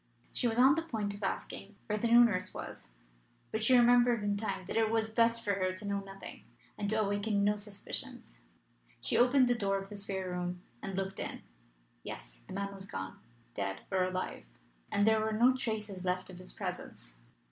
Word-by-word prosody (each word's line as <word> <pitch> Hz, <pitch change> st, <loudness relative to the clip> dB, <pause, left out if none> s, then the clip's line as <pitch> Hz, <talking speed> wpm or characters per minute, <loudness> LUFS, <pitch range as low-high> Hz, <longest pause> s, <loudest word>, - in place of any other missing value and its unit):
She 245 Hz, -, +3 dB
was 225 Hz, 0 st, -1 dB
on 260 Hz, +2 st, +7 dB
the 330 Hz, -, +1 dB
point 220 Hz, -10 st, -3 dB
of 200 Hz, -, -10 dB
asking 200 Hz, 0 st, -4 dB
where 210 Hz, -, -1 dB
the 215 Hz, +2 st, 0 dB
new 235 Hz, +1 st, +8 dB
nurse 200 Hz, -6 st, +1 dB
was, -, -, -7 dB, 0.6 s
but 220 Hz, -, -1 dB
she 250 Hz, +2 st, +6 dB
remembered 240 Hz, -2 st, +5 dB
in 205 Hz, 0 st, +1 dB
time 200 Hz, -3 st, -3 dB
that -, -, -5 dB
it 225 Hz, -1 st, +3 dB
was 220 Hz, 0 st, +1 dB
best 230 Hz, +1 st, +3 dB
for 205 Hz, -2 st, +1 dB
her 185 Hz, -1 st, 0 dB
to 200 Hz, +2 st, -7 dB
know 200 Hz, 0 st, 0 dB
nothing, 195 Hz, 0 st, -9 dB, 0.3 s
and 205 Hz, -1 st, -2 dB
to 220 Hz, +1 st, +2 dB
awaken 205 Hz, 0 st, +1 dB
no 205 Hz, +1 st, +3 dB
suspicions. 205 Hz, -, -6 dB, 0.6 s
She -, -, 0 dB
opened 250 Hz, +1 st, +5 dB
the 245 Hz, -, +4 dB
door 200 Hz, -4 st, 0 dB
of 195 Hz, 0 st, -6 dB
the 210 Hz, -, -7 dB
spare 195 Hz, -2 st, -3 dB
room 180 Hz, 0 st, -3 dB, 0.2 s
and 195 Hz, -, -4 dB
looked 195 Hz, 0 st, -3 dB
in. -, -, -4 dB, 0.6 s
Yes; -, -, -9 dB
the -, -, -8 dB
man 200 Hz, 0 st, -2 dB
was 195 Hz, 0 st, -9 dB
gone 95 Hz, 0 st, -6 dB, 0.3 s
dead 95 Hz, -1 st, -3 dB
or 190 Hz, -1 st, +3 dB
alive 185 Hz, -, -3 dB, 0.5 s
and 205 Hz, -, +3 dB
there 220 Hz, 0 st, +5 dB
were 220 Hz, 0 st, 0 dB
no 245 Hz, +4 st, +5 dB
traces 215 Hz, -6 st, -3 dB
left 185 Hz, 0 st, -1 dB
of 180 Hz, -, -10 dB
his 185 Hz, -, -7 dB
presence. -, -, -7 dB
205 Hz, 200 wpm, -32 LUFS, 190-225 Hz, 0.6 s, new